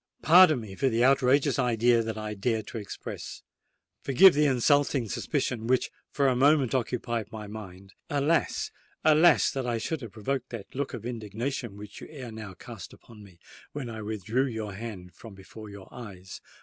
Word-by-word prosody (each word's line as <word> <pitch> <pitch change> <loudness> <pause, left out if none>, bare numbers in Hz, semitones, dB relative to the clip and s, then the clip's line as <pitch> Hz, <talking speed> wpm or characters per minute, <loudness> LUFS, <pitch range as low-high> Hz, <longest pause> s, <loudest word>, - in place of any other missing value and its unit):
"Pardon 165 -4 +7
me 105 -3 -9
for 135 +7 +1
the 115 0 +1
outrageous 135 +1 +3
idea 120 -1 +3
that 110 -1 -4
I 110 0 -4
dared 110 +1 -1
to 115 - -5
express—forgive 140 - 0
the 150 +1 +3
insulting 135 -1 +2
suspicion 125 -1 -2
which 130 0 +1 0.2
for 140 -1 +1
a 130 - +2
moment 140 -1 +3
occupied 120 -3 -2
my 110 -1 -7
mind! 100 -2 -10 0.2
Alas! 145 +3 0 0.3
alas! 155 +1 +5
that 135 -2 -3
I 120 -1 0
should 150 +6 -3
have 115 -4 -8
provoked 130 +4 -3
the 115 -5 -7
look 140 +1 -3
of 115 - -9
indignation 115 0 -4
which 105 0 -10
you - - -9
ere 130 -6 -8
now 110 -4 -8
cast - - -10
upon 110 -2 -16
me, 95 -4 -16 0.4
when 135 -5 -5
I 110 -1 -6
withdrew 110 +5 -1
your 110 -4 -5
hand 95 -4 -8
from 110 0 -12
before 105 +3 -11
your 100 -2 -11
eyes! 95 -6 -10
115 Hz, 175 wpm, -28 LUFS, 105-135 Hz, 0.4 s, Pardon